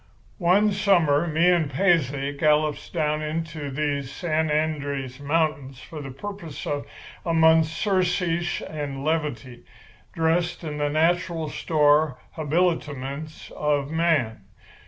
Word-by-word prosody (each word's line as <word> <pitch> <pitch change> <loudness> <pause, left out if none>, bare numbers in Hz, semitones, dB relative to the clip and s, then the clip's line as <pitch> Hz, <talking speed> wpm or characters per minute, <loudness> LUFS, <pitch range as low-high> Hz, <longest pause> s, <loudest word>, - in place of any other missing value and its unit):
"One 195 +4 +4
summer 175 -6 +3
me 165 +2 +2
and 165 -5 +1
Paisley 145 -4 +1
gallops 150 0 +1
down 150 -2 -1
into 155 -1 -4
these 140 -1 -2
San 160 0 -1
Andrés 140 -4 -2
mountains 145 -3 -1
for 155 +3 -9
the 135 - -7
purpose 170 +2 -7
of 145 -1 -3 0.4
a 165 -1 0
month's 160 0 +5
surcease 175 -2 0
and 145 -3 -5
levity, 145 -7 -2 0.5
dressed 170 +2 0
in 150 -2 -5
the 145 0 +1
natural 165 +1 +1
store 150 -3 +2
habiliments 155 -2 -2
of 145 -1 0
man. 160 -10 +1
155 Hz, 115 wpm, -24 LUFS, 145-165 Hz, 0.5 s, month's